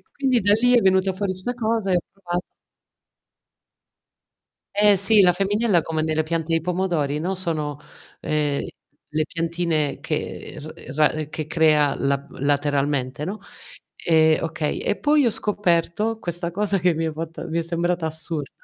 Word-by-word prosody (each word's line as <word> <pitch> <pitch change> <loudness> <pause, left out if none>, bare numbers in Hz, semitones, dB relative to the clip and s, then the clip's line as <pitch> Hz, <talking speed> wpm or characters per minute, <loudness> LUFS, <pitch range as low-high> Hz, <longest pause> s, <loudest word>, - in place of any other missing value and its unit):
e - - -32
quindi 265 -4 +1
da 205 +1 +3
lì 245 0 +4
è - - +6
venuta 190 0 +3
fuori 195 -1 -2
sta 185 +7 -3
cosa 220 -4 0
e - - +4
ho - - +2
provato 180 -2 -4 2.3
Eh 205 -1 +6
sì, 205 +2 +4
la 180 -1 +6
femminella 200 0 +2
come 160 -1 -2
nelle 155 0 +1
piante 165 +1 -2
di 165 - +3
pomodori, 170 -5 -1
no, 180 +5 -2
sono, 155 -5 -2 0.4
ehm, 150 -2 0 0.5
le 155 0 0
piantine 165 -3 -1
che - - -4
r 130 - -10
ra 150 0 +4 0.2
che 155 -1 -5
crea 155 -3 +3
la 140 0 -1
lateralmente, 145 -1 0
no, 200 +5 -4 0.7
ehm, 160 -2 +4
okay. 160 -2 -2
E - - 0
poi 295 -1 +3
ho 235 - +4
scoperto 205 +2 0
questa 175 -3 -4
cosa 200 +2 0
che 180 -1 +2
mi 165 +1 -1
è 160 - -2
fatta 165 +2 -6
mi 165 0 -2
è 170 - +1
sembrata 170 +1 -1
assurda, 160 -2 -4
170 Hz, 160 wpm, -23 LUFS, 155-195 Hz, 2.3 s, è